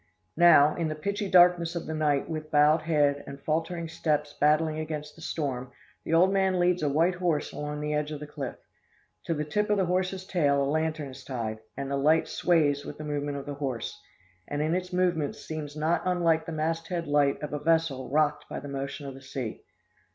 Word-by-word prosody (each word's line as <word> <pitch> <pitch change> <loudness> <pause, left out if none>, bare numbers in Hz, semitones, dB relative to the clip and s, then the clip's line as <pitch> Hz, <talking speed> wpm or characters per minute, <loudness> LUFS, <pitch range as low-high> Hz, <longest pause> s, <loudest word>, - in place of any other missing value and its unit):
"Now, 155 -4 +7
in 165 - -2
the 155 - -3
pitchy 200 +5 -3
darkness 175 -2 +5
of 170 - -3
the 160 - -4
night, 150 -3 +1
with 155 -1 -5
bowed 150 +1 +4
head, 145 -3 +1
and 140 - -8
faltering 165 +3 -2
steps 150 -2 -1
battling 155 +1 +3
against 150 -1 -5
the 165 - -15
storm, 130 -6 -3 0.3
the - - -5
old 185 +4 +5
man 190 -2 +2
leads 180 0 +2
a 150 - +1
white 165 +6 +3
horse 175 -4 -1
along 150 0 -4
the 150 0 -2
edge 150 0 -1
of 150 - -5
the 150 - -6
cliff. 145 -3 -6 0.7
To 165 - -1
the 150 0 -2
tip 210 +8 -1
of 210 - +3
the 190 - +2
horse's 185 +1 -1
tail 145 -7 +2
a - - +1
lantern 155 0 -1
is 130 0 -11
tied, 115 -4 -4 0.2
and 140 0 -4
the 140 - 0
light 155 +4 +3
sways 145 -5 +2
with - - -8
the 155 - -7
movement 145 -1 -3
of 140 - -6
the 145 - -4
horse, 135 -7 -4 0.5
and 145 - -3
in 155 +2 0
its 180 +1 -2
movements 175 -5 0
seems 150 -2 -6
not 160 +3 +1
unlike 170 -3 +1
the - - -4
masthead 165 +2 -2
light 145 -1 +2
of 150 - -4
a 150 - -2
vessel 160 -4 +1
rocked 150 +1 +1
by - - -4
the - - -9
motion 140 +1 -5
of 135 - -6
the 135 - -12
sea. 130 -4 -5
155 Hz, 215 wpm, -28 LUFS, 145-170 Hz, 0.7 s, Now